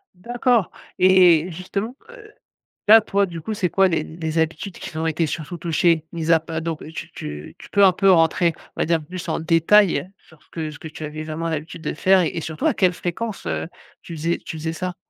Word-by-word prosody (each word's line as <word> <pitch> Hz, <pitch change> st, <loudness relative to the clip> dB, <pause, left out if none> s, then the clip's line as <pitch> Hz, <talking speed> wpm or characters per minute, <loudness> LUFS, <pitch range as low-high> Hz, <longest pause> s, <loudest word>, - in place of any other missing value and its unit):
D'accord 240 Hz, +1 st, 0 dB, 0.3 s
et 180 Hz, -2 st, +5 dB
justement, 200 Hz, +8 st, -4 dB
heu, 430 Hz, -4 st, -14 dB, 0.6 s
là, 220 Hz, +2 st, +9 dB
toi 200 Hz, -1 st, +1 dB
du 170 Hz, -3 st, -8 dB
coup, 215 Hz, +6 st, -4 dB
c'est 180 Hz, -3 st, 0 dB
quoi 195 Hz, -1 st, +4 dB
les 165 Hz, -3 st, 0 dB
les 160 Hz, 0 st, -5 dB
habitudes 160 Hz, +3 st, -2 dB
qui -, -, -7 dB
sont 160 Hz, +1 st, -2 dB
été 160 Hz, +1 st, 0 dB
surtout 160 Hz, +3 st, -5 dB
touchées? 165 Hz, -1 st, +1 dB
Mis 165 Hz, -1 st, -1 dB
à 165 Hz, -, +6 dB
pa 160 Hz, 0 st, -5 dB
donc 165 Hz, -1 st, -4 dB
heu, 160 Hz, -, -9 dB
tu -, -, -7 dB
tu 75 Hz, +1 st, -8 dB
tu -, -, -14 dB
peux 200 Hz, -, +4 dB
un 190 Hz, -, +7 dB
peu 195 Hz, +1 st, +4 dB
rentrer, 165 Hz, 0 st, +3 dB, 0.2 s
on -, -, -3 dB
va -, -, +2 dB
dire, 165 Hz, +1 st, +2 dB
un -, -, -8 dB
peu 150 Hz, -, -14 dB
plus 180 Hz, 0 st, -7 dB
en 160 Hz, -, -1 dB
détail 165 Hz, +1 st, +3 dB
sur 160 Hz, -2 st, -22 dB
ce -, -, -31 dB
que 160 Hz, -2 st, -4 dB
ce 150 Hz, -, -10 dB
que -, -, -9 dB
tu 155 Hz, 0 st, -9 dB
avais 155 Hz, +1 st, -5 dB
vraiment 160 Hz, +2 st, -4 dB
l'habitude 160 Hz, +1 st, -5 dB
de 150 Hz, -, -3 dB
faire 190 Hz, +3 st, +4 dB
et 170 Hz, -, +1 dB
et 165 Hz, -, -4 dB
surtout 160 Hz, -, -2 dB
à 285 Hz, -, +1 dB
quelle 185 Hz, -2 st, +3 dB
fréquence, 195 Hz, +5 st, -5 dB
heu, -, -, -2 dB, 0.4 s
tu 170 Hz, -, -8 dB
faisais 165 Hz, +2 st, -1 dB
tu 160 Hz, -, -6 dB
faisais 160 Hz, +1 st, -3 dB
ça? 180 Hz, +1 st, -4 dB
170 Hz, 240 wpm, -22 LUFS, 160-185 Hz, 0.6 s, là